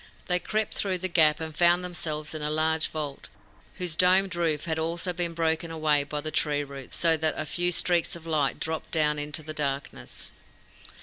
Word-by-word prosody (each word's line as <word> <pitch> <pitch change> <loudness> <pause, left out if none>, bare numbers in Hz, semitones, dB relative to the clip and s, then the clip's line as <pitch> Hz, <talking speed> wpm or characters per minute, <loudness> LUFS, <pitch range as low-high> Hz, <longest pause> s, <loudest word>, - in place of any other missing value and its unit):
They 180 -1 +1
crept 215 +4 -2
through 190 -2 0
the 185 +1 -1
gap, 160 -4 +4
and 160 -1 -6
found 175 +2 +4
themselves 155 -4 -3
in 155 - -5
a 150 - 0
large 160 +1 +2
vault, 150 -3 -6 0.5
whose 175 -3 -2
domed 185 +2 +4
roof 160 -4 0
had 160 -1 -1
been 160 - 0
also 170 +2 -1
broken 165 -1 -1
away 155 -3 +1
by 150 +1 -4
tree 150 -1 0
roots 140 -2 -8
so 165 -1 +4
that 155 0 0
a 155 - -3
few 175 +3 +2
streaks 175 -1 +2
of 165 -1 -11
light 155 -4 0
dropped 160 0 -4
down 150 -2 +1
into 150 +2 -3
the 155 +1 -6
darkness. 140 -2 -4
160 Hz, 190 wpm, -27 LUFS, 150-175 Hz, 0.5 s, gap